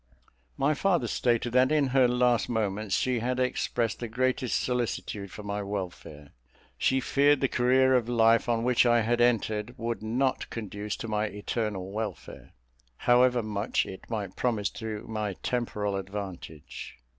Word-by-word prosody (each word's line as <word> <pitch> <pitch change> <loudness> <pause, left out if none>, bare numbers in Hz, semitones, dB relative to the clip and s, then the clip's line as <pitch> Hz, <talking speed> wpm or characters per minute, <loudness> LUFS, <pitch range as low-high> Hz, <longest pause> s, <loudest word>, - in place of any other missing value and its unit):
My 145 +3 +2
father 175 -4 +1
stated 120 0 0
that 130 +2 +4
in 150 -3 +2
her 130 -1 +4
last 125 -1 +2
moments 105 -3 -1
she 125 -2 +1
had 125 +2 -1
expressed 125 -2 -1
the 120 - -4
greatest 130 +2 0
solicitude 115 -5 -2
for 105 - -9
my 100 0 -3
welfare. 90 -7 -6 0.4
She 130 - +2
feared 140 +2 +3
the 135 - +2
career 130 +1 +3
of 120 -2 +2
life 115 0 +4
on 115 -1 +1
which 125 0 +4
I 120 -1 +4
had 120 +2 +1
entered 110 -1 +1
would 115 -1 -3
not 125 +5 -1
conduce 105 -2 -5
to 115 - -6
my 105 0 0
eternal 105 -2 -3
welfare, 110 +1 -6 0.4
however 125 0 +4
much 105 +1 -1
it 95 - -10
might 105 -5 -4
promise 110 -6 0
to 110 -2 -6
my 105 -2 -2
temporal 105 -5 -1
advantage. 95 -6 -7
115 Hz, 155 wpm, -28 LUFS, 105-125 Hz, 0.4 s, that